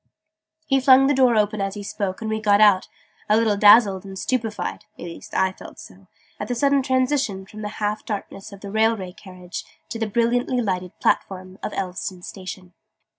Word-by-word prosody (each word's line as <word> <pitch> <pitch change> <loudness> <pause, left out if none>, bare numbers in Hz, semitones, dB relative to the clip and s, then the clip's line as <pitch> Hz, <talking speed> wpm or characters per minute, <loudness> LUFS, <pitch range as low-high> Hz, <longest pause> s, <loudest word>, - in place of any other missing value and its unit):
He 270 -3 +2
flung 265 0 +6
the 285 - +3
door 255 -3 +4
open 210 -1 +1
as 195 +1 -2
he 205 - -6
spoke, 200 -1 -4
and 220 - -3
we 220 0 -2
got 205 -1 +4
out, 205 -3 +5 0.4
a 215 - +5
little 220 -2 +2
dazzled 205 -2 +6
and 195 -1 -9
stupefied 225 -1 -3
(at - - -9
least 170 - -10
I 190 0 +2
felt - - -13
so) - - -14 0.3
at - - -4
the 245 - -2
sudden 280 +2 +3
transition 260 -6 0
from 215 +2 -11
the 210 - -3
half 210 0 -2
darkness 200 -2 -6
of 200 -1 -12
the 200 - -7
railway 220 -3 +1
carriage 185 -2 -9 0.3
to 230 - -5
the 225 - -1
brilliantly 240 +3 +1
lighted 185 -5 -3
platform 185 0 -1
of - - -4
Elveston 185 -1 -4
Station. 185 -1 -9
210 Hz, 190 wpm, -22 LUFS, 190-235 Hz, 0.4 s, flung